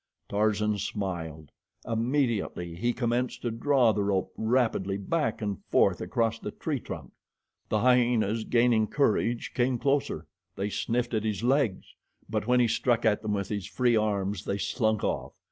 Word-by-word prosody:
Tarzan 105 0 +1
smiled. 85 -7 -4 0.3
Immediately 115 -7 -1
he 120 +8 0
commenced 120 +1 -1
to 120 - -1
draw 125 0 +3
the 105 - -1
rope 100 -2 0
rapidly 110 -4 +1
back 125 - -1
and 100 -2 -3
forth - - +3
across 115 +3 0
the - - -5
tree 145 +6 -3
trunk. 80 - -8 0.6
The 110 - +1
hyenas, 120 -3 +3
gaining 115 -2 +3
courage, 120 -3 +1
came 125 0 +1
closer. 135 - 0 0.3
They 100 +2 -2
sniffed 120 +3 -1
at 110 -1 0
his 110 0 -2
legs; 125 -6 +1 0.3
but - - -2
when 125 0 +4
he 120 - +4
struck 120 +1 +1
at 105 -2 +3
them 105 -1 -2
with 100 -2 -2
his 100 -2 -3
free 120 +1 +2
arms 100 -2 0
they 100 - -1
slunk 110 0 0
off. - - -2
110 Hz, 160 wpm, -28 LUFS, 100-120 Hz, 0.6 s, when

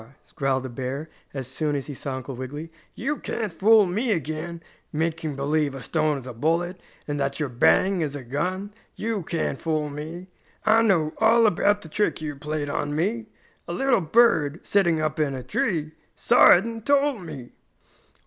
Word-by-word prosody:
growled 135 -2 0
the - - -4
bear, 135 +5 -5 0.2
as 135 -3 -5
soon 150 +2 -1
as 140 - -3
he 145 - -6
saw 135 0 -5
Uncle 130 +1 -6
Wiggily, 145 +6 -6 0.2
"you 285 +6 -2
can't 215 -6 -4
fool 215 +4 +5
me 215 +7 -1
again, 165 0 -3 0.3
making 160 -1 -2
believe 145 +1 0
a 135 - -7
stone 155 -2 +1
is 130 - -9
a 125 - -7
bullet, 170 +8 -1 0.3
and 145 -1 -2
that 140 +1 -1
your 150 -3 -1
'Bang!' 185 +9 +3
is 145 -3 -2
a 140 - -6
gun! 185 - -3 0.2
You 220 -2 -2
can't 165 -4 -2
fool 155 -3 -1
me! 160 +5 -7 0.4
I 220 +1 +5
know 170 -9 +2
all 230 +1 +5
about 205 +1 +2
the - - -9
trick 210 +7 0
you 150 -2 -4
played 150 +1 -3
on 145 +1 -2
me. 220 +8 -1 0.4
A 170 - -4
little 250 +1 +2
bird, 160 -5 +3
sitting 175 -5 +3
up 155 0 -1
in 145 -3 +1
a 130 - -6
tree, 155 - -1 0.2
saw - - +6
it 180 +4 +7
and 230 -1 -6
told 280 -3 +2
me!" 145 -8 -9
155 Hz, 185 wpm, -25 LUFS, 145-200 Hz, 0.4 s, it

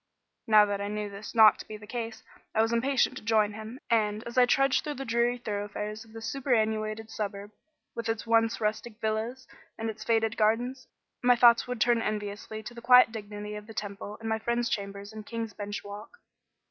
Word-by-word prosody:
Now 215 -1 +7
that 200 -1 -2
I 200 - -2
knew 210 0 -3
this 200 +3 -9
not 220 -2 +7
to - - -9
be 215 - -7
the 210 - -12
case, 230 0 -5 0.3
I 220 - +4
was 225 +1 0
impatient 255 +1 +2
to - - -9
join 215 -1 +2
him; 220 +4 -8
and, 215 -1 +1
as 235 - -8
I 250 -1 +6
trudged 275 +1 +3
through 295 -1 -4
the 270 - -5
dreary 235 +1 +1
thoroughfares 210 -1 -4
of 225 -1 -19
this 225 0 -7
superannuated 220 -3 -1
suburb, 205 -1 -5 0.4
with 230 -1 -4
its 225 0 -2
once 225 0 +2
rustic 215 +1 -2
villas 220 +4 -2 0.3
and 225 0 -2
its 215 0 -10
faded 225 0 +1
gardens, 240 +4 +1 0.3
my 245 0 +5
thoughts 235 0 +6
would 250 -1 -4
turn 235 +1 +3
enviously 210 0 -4
to 240 - -8
the 235 - -10
quiet 250 -1 +7
dignity 210 -1 -7
of 210 0 -8
the 225 - -11
Temple 205 0 -5
and 225 - -6
my 220 0 0
friend's 235 +1 0
chambers 200 +1 -4
in 215 - -7
King's 225 -1 -5
Bench 205 +1 -5
Walk. 205 +1 -8
220 Hz, 205 wpm, -28 LUFS, 210-235 Hz, 0.4 s, Now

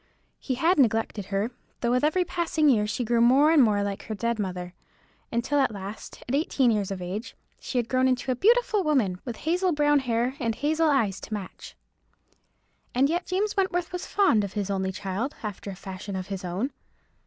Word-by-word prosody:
He 260 - -2
had 325 +6 +2
neglected 225 -4 +1
her, 200 +4 -1 0.3
though 235 - +1
with 250 +2 +2
every 355 +4 +2
passing 325 -3 +1
year 210 -5 +3
she 220 +4 -2
grew 235 0 +2
more 270 +6 +5
and 320 -3 +6
more 210 -4 +3
like 200 -1 -3
her 220 - -4
dead 235 +2 -1
mother, 180 -2 -4 0.6
until 260 +5 0
at 275 - +3
last, 200 +1 -8
at 250 - -3
eighteen 275 -4 +2
years 205 -3 0
of 190 -2 -4
age, 195 +6 -5 0.2
she 255 - -4
had 240 -2 +1
grown 255 +1 +2
into 255 0 0
a - - 0
beautiful 440 - +3
woman, 235 - +1
with 240 -3 -4
hazel 355 +6 0
brown 295 -1 +3
hair, 245 -1 0
and 230 -4 -1
hazel 315 +4 +1
eyes 220 -10 +1
to - - -7
match. 195 -3 -8 1.2
And 275 +4 +3
yet 350 +1 -1
James 400 +3 0
Wentworth 355 -3 0
was 360 0 -5
fond 375 - +3
of 200 - -5
his 205 -2 -2
only 190 -1 -1
child, 200 +7 -3
after 205 -1 -5
a 195 - -6
fashion 190 +1 -7
of 185 0 -5
his 195 -2 -4
own. 185 +10 -2
240 Hz, 200 wpm, -26 LUFS, 200-295 Hz, 1.2 s, and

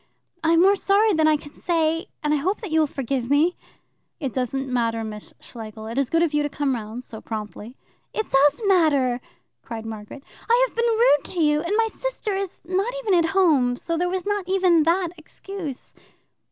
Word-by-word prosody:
"I 325 +1 +3
am 335 - +5
more 395 +2 +5
sorry 405 +2 +3
than 315 -2 +3
I 310 -1 +4
can 290 0 -13
say, 330 +1 0 0.2
and 300 0 +1
I - - +3
hope 370 - -1
that 410 -7 -6
you 320 - +3
will 310 - +3
forgive 265 -3 -3
me." 310 +5 +3 0.6
"It 270 -6 -3
doesn't 265 +1 -2
matter, 230 -3 0
Miss 210 -1 -7
Schlegel. 220 -2 -9
It 230 +4 -3
is 275 - 0
good 330 +1 +3
of 320 -3 0
you 295 - +2
to - - -1
have - - -13
come 285 -2 0
round 225 +1 -5
so 220 -3 -7
promptly." 215 +2 -7 0.3
"It 440 - -3
does 290 - +3
matter," 285 -10 +3 0.4
cried 225 -1 -7
Margaret. 220 +5 -8 0.3
"I - - +5
have - - -21
been 470 0 +1
rude 455 - +3
to - - -2
you; 300 -1 +3
and 345 +5 -1
my 455 0 +3
sister 485 -2 -4
is 390 -1 -4
not 380 +6 0
even 405 - +2
at 335 -2 +3
home, 290 -10 +4
so 335 +6 -3
there 355 +2 0
was 370 -1 -3
not 410 -3 -2
even 365 -3 +4
that 345 +1 +2
excuse. 320 -3 -8
315 Hz, 210 wpm, -23 LUFS, 255-375 Hz, 0.6 s, am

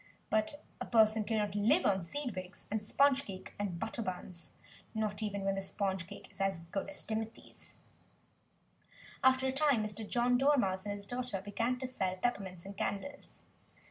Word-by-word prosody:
But 215 +7 +1 0.2
a - - -3
person 220 -2 +5
cannot 210 -3 0
live 230 - +4
on 195 -2 +3
"seed 245 - -3
wigs" 185 +1 -7
and 215 0 0
sponge 275 +5 +4
cake 190 -6 -8
and 195 -4 -1
butter 225 +6 -3
buns 180 -5 -5 0.5
not 215 -1 -1
even 200 -2 -2
when 195 0 +2
the 195 - -1
sponge 190 -2 -2
cake - - -10
is - - -5
as 195 -3 +1
good 195 +5 -2
as 295 - -2
Timothy's! 220 0 -5 1.5
After 260 0 +5
a 265 - +2
time 270 -4 +3
Mr. 210 0 -4
John 245 +1 +3
Dormouse 245 -10 +3
and 205 - -1
his 200 0 -6
daughter 245 -2 -2
began 230 +6 0
to 260 - -4
sell 190 -7 -1
peppermints 190 -5 -2
and 200 +1 -7
candles. 280 +9 -4
210 Hz, 175 wpm, -34 LUFS, 195-245 Hz, 1.5 s, person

